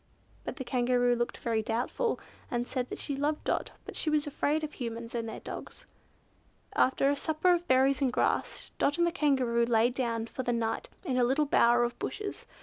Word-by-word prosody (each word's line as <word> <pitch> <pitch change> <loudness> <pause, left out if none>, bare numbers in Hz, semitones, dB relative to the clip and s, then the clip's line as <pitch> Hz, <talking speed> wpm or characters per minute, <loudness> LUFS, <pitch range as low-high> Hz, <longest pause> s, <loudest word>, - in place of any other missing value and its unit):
But - - -4
the 265 - -5
Kangaroo 245 -1 +2
looked 240 0 -2
very 230 -2 0
doubtful, 245 - -1 0.3
and 240 -1 -1
said 255 0 -3
that - - -5
she 285 - -3
loved 295 +2 -1
Dot, - - -1 0.2
but - - -8
she 315 - 0
was 300 -1 +2
afraid 295 +1 0
of 305 - -4
Humans 230 -2 -5
and 230 -1 -2
their - - -7
dogs. - - -8 0.9
After 275 +2 +3
a - - +1
supper 315 +4 +2
of 350 0 -1
berries 265 +1 +4
and 265 -2 +2
grass, - - -1
Dot 290 - +2
and 345 - +4
the 340 - +1
Kangaroo 260 -8 +2
lay 235 0 +3
down 235 -3 -1
for 245 - -5
the 245 -1 0
night 225 -1 -2 0.2
in 260 -6 0
a 250 - +4
little 270 +5 +2
bower 240 -3 +4
of 240 0 -2
bushes. 415 -1 -5
255 Hz, 205 wpm, -30 LUFS, 240-290 Hz, 0.9 s, berries